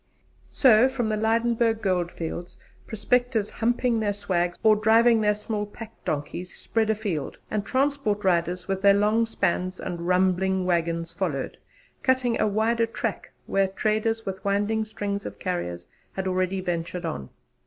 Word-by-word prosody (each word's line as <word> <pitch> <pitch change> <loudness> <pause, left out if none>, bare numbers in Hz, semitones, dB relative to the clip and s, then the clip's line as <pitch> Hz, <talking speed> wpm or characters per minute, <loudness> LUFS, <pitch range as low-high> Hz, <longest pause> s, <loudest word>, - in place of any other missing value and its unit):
So 250 -1 +5
from 245 -4 -2
the 215 - +1
Lydenburg 225 +1 +1
Goldfields 175 -2 -2 0.3
prospectors 230 0 0
'humping 240 0 +1
their 205 -2 0
swags' 180 -3 -1
or 215 -1 +6
driving 225 +2 +4
their 210 -1 +3
small 210 0 -3
pack 225 +1 -10
donkeys 165 +4 -3
spread 225 -1 -1
afield, 200 -10 -2
and 210 -2 0
transport 260 -6 0
riders 180 -1 +1
with 195 -1 -2
their 200 0 +6
long 215 +3 +2
spans 185 -3 -1
and 170 -1 -5
rumbling 185 +1 +2
waggons 170 -1 0
followed, 170 -7 -2 0.5
cutting 255 -3 +1
a - - +3
wider 225 +3 +1
track 230 - -4
where 195 0 +2
traders 220 +3 -1
with 190 -1 -5
winding 205 +2 +1
strings 205 -2 -4
of - - -7
carriers 90 - -4 0.3
had 190 -1 -3
already 185 +1 0
ventured 175 0 -3
on. 70 - -4
205 Hz, 145 wpm, -25 LUFS, 180-225 Hz, 0.5 s, or